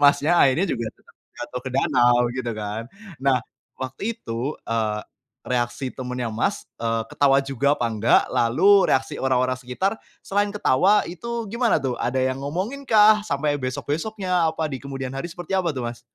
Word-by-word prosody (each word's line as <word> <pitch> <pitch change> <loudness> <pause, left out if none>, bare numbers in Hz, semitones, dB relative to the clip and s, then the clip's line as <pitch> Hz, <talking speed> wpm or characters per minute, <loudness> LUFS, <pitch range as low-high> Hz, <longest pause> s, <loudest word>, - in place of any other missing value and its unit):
Mas 140 0 +5
nya 170 +4 +3
akhirnya 140 +7 +4
juga 115 -2 -2
tetap, - - -24 0.2
jatuh 125 - -5
ke - - -2
danau, 120 -3 +4 0.2
gitu 125 -2 -3
kan. 105 +1 -4 0.4
Nah, 135 -2 +3 0.4
waktu 135 - -4
itu, 120 +6 -4
eee, 110 -2 -1 0.5
reaksi 125 +1 -1
temennya 125 -2 -4
Mas, 195 - -1
eee, 115 -1 0
ketawa 135 -1 +4
juga 140 +1 +1
apa 120 - +1
enggak? 110 +1 +3
Lalu, 185 - +4
reaksi 130 - -1
orang-orang 130 -1 +1
sekitar 130 - -2 0.3
selain 205 +1 0
ketawa 200 +3 +3
itu 235 +6 -4
gimana 235 -5 +2
tuh? 130 -2 -1
Ada 130 +2 0
yang 130 +1 0
ngomongin 190 - -3
kah? 215 -2 +6
Sampai 145 +1 0
besok-besoknya, 165 +7 -1
apa 160 0 -2
di 135 - -4
kemudian 135 -2 -5
hari 135 +5 -3
seperti 175 +2 -7
apa 180 -3 +1
tuh 125 -2 -4
Mas? 120 0 -6
135 Hz, 165 wpm, -23 LUFS, 125-180 Hz, 0.5 s, kah